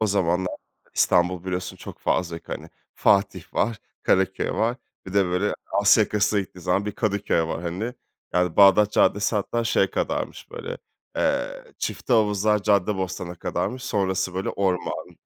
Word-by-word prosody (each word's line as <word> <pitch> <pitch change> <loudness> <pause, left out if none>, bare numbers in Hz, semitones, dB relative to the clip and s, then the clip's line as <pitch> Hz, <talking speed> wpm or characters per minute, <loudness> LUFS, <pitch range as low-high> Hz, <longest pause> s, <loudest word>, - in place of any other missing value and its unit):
O 110 - +2
zamanlar, 95 -2 +1 0.4
İstanbul 90 0 +2
biliyorsun 90 0 -3
çok - - -10
fazla 85 -2 0
yok, 85 - -13
hani, - - -6 0.2
Fatih 100 0 +1
var, 110 +1 +1 0.2
Karaköy 95 0 +1
var, 115 +2 0 0.3
bir 95 - -8
de 100 - +5
böyle 90 +3 0
Asya 100 +2 +5
yakasına 105 0 +1
gittiğin 90 -2 -9
zaman 95 +4 +1
bir 105 - -2
Kadıköy 100 -5 0
var, 80 +1 -3
hani. 95 +8 -3 0.4
Yani 90 -2 +1
Bağdat 100 +1 +6
Caddesi 105 +1 +3
hatta 115 +3 -1
şey 110 - +3
kadarmış - - -3
böyle, 475 0 -6 0.4
eee, - - 0
Çiftehavuzlar 105 -3 +1
Caddebostan'a 95 -3 0
kadarmış. 125 +8 -3
Sonrası 95 -5 -1
böyle 95 - -2
orman, 95 -2 -2
100 Hz, 145 wpm, -24 LUFS, 90-105 Hz, 0.4 s, Bağdat